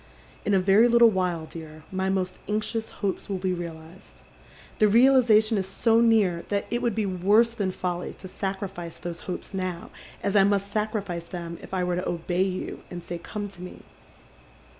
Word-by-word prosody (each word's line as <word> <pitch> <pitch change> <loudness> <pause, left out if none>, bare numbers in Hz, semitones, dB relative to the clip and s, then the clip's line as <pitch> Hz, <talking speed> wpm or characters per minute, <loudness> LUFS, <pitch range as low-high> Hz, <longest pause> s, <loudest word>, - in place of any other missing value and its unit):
In 205 - +3
a - - +5
very 195 +5 +5
littlo 235 0 +7
while, 180 -4 -1
dear, 155 -1 -10
my 190 0 -1
most 185 -1 -1
anxious 215 +1 -1 0.2
hopes 195 +2 -2
will 195 - -1
be 185 0 -1
realized. 170 0 -9 0.6
The 215 - +6
realization 230 -2 +5
is 190 - -3
so 225 +4 +3
near 210 -7 +3
that 200 -1 0
it 240 +1 0
would 235 -4 0
be 220 - 0
worse 200 +5 +3
than 205 -5 -1
folly 180 -1 -3
to 190 - -9
sacrifice 190 -3 -5
those 170 -1 -6
hopes 180 - -5
now, 185 -2 -4 0.3
as 200 0 0
I 195 - +7
must 200 0 +1
sacrifice 205 -5 -2
them 170 -1 -6
if - - -12
I 185 -1 0
were 180 0 0
to 180 - -2
obey 175 +2 0
yc, 185 - -5
and 175 -1 -7
say 175 0 -5
come 205 +4 -5
to 185 -2 -14
me. 180 - -9
190 Hz, 185 wpm, -26 LUFS, 175-210 Hz, 0.6 s, littlo